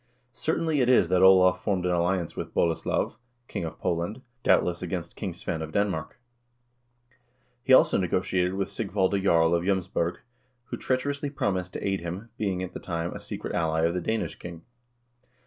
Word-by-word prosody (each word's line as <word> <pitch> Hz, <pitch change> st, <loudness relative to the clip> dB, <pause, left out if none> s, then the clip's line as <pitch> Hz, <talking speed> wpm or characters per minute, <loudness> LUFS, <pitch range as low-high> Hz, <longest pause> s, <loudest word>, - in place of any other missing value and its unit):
Certain 160 Hz, +3 st, -1 dB
it 135 Hz, -6 st, +2 dB
is 110 Hz, -9 st, +5 dB
that 90 Hz, 0 st, +3 dB
Olav 95 Hz, -1 st, +6 dB
formed 95 Hz, -4 st, 0 dB
an 90 Hz, -, +1 dB
alliance 90 Hz, 0 st, 0 dB
with -, -, -6 dB
Boleslav, 85 Hz, +5 st, 0 dB, 0.3 s
king -, -, -4 dB
of 80 Hz, -, -6 dB
Poland, 90 Hz, +9 st, -2 dB, 0.2 s
doubtless 90 Hz, -6 st, +2 dB
against 90 Hz, -2 st, -4 dB
King -, -, -4 dB
Svein 80 Hz, -, -4 dB
of 80 Hz, -1 st, -5 dB
Denmark. 95 Hz, -1 st, -1 dB, 1.4 s
He -, -, -1 dB
also 130 Hz, -, +6 dB
negotiated 90 Hz, 0 st, 0 dB
with 100 Hz, 0 st, -2 dB
Sigvalde 100 Hz, -2 st, 0 dB
Jarl 85 Hz, -3 st, +4 dB
of 85 Hz, 0 st, +1 dB
J 95 Hz, -, -1 dB
6ms 95 Hz, -2 st, 0 dB
borg, 85 Hz, +1 st, 0 dB, 0.5 s
who -, -, -4 dB
treacherously 140 Hz, +3 st, -1 dB
promised 95 Hz, -9 st, -2 dB
to -, -, -3 dB
aid 95 Hz, -1 st, 0 dB
him, 90 Hz, +7 st, -6 dB
being 95 Hz, -3 st, -1 dB
at 90 Hz, -, -6 dB
the -, -, -6 dB
time 85 Hz, -1 st, -3 dB
a -, -, -7 dB
secret -, -, -6 dB
ally 80 Hz, -1 st, +1 dB
of 85 Hz, +1 st, +2 dB
the 90 Hz, -, -2 dB
Danish 110 Hz, +5 st, -2 dB
king. 85 Hz, -1 st, -9 dB
90 Hz, 180 wpm, -27 LUFS, 85-100 Hz, 1.4 s, Olav